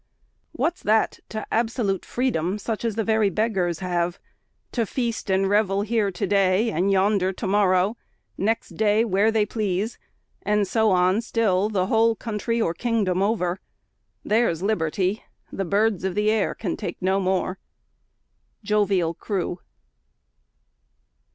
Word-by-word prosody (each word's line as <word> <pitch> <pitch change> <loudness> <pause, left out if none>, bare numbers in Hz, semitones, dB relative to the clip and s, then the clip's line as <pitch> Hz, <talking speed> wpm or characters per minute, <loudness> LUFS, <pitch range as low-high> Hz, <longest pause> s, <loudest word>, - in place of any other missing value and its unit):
What's 345 +2 -1
that 220 +1 +1
to 215 0 -5
absolute 225 -4 0
freedom, 205 -7 -1
such 220 +2 -4
as 230 -3 -1
the 225 - 0
very 220 -1 +2
beggars 195 -5 -1
have; 175 0 -1 0.5
to 230 -3 -1
feast 235 -4 -3
and 190 0 +2
revel 200 -1 +2
here 215 -1 +1
to 195 +2 -3
day, 200 +3 +2
and 190 +2 +1
yonder 195 -1 +2
to 195 - -6
morrow; 195 +1 +2 0.4
next 225 +3 -1
day 215 +1 +2
where 200 +1 +2
they 220 -1 +2
please; 210 0 -2 0.4
and 210 -1 +1
so 220 +2 +2
on 185 +3 +3
still, 215 -4 +1
the 190 -4 0
whole 225 +3 +3
country 225 +1 -2
or 170 -7 +1
kingdom 200 -3 0
over? 195 -3 0 0.7
There's 210 -6 +1
liberty! 190 0 0 0.3
the 195 - -3
birds 200 0 +1
of 190 -1 -2
the 210 +1 +2
air 215 -3 0
can 185 -6 -3
take 190 -6 -6
no 190 +1 +1
more. 190 0 -1 1.0
JOVIAL 200 -5 +1
CREW. 180 0 -3
205 Hz, 140 wpm, -24 LUFS, 185-220 Hz, 1.0 s, on